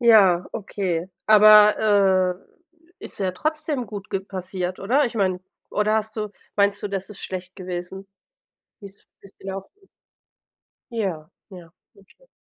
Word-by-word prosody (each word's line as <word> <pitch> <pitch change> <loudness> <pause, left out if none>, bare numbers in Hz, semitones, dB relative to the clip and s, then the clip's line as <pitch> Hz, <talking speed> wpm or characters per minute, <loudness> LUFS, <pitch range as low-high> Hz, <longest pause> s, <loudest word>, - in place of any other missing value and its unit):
Ja, 195 -7 +5
okay. 185 -4 -3 0.2
Aber, 210 -3 +6 0.6
äh, - - -10
ist - - -8
ja 190 -2 0
trotzdem 305 - -2
gut 205 0 -8
ge 195 -2 -1
passiert, 185 -1 -5
oder? 260 +9 +2
Ich 235 - -7
meine, 185 -4 0 0.3
oder 210 +1 +1
hast 220 0 -3
du 210 -1 -3 0.3
meinst 200 0 +2
du, 205 - -3
das 195 -1 -4
ist 205 - -9
schlecht 185 0 -6
gewesen, 185 +1 -6 0.7
wie's 200 -1 -14
wie's 195 - -17
gelaufen 195 0 -7
ist? - - -24 1.0
Ja, 185 -9 -3 0.2
ja, 175 -4 -12 0.2
okay. 200 - -23
195 Hz, 140 wpm, -23 LUFS, 185-215 Hz, 1.0 s, Aber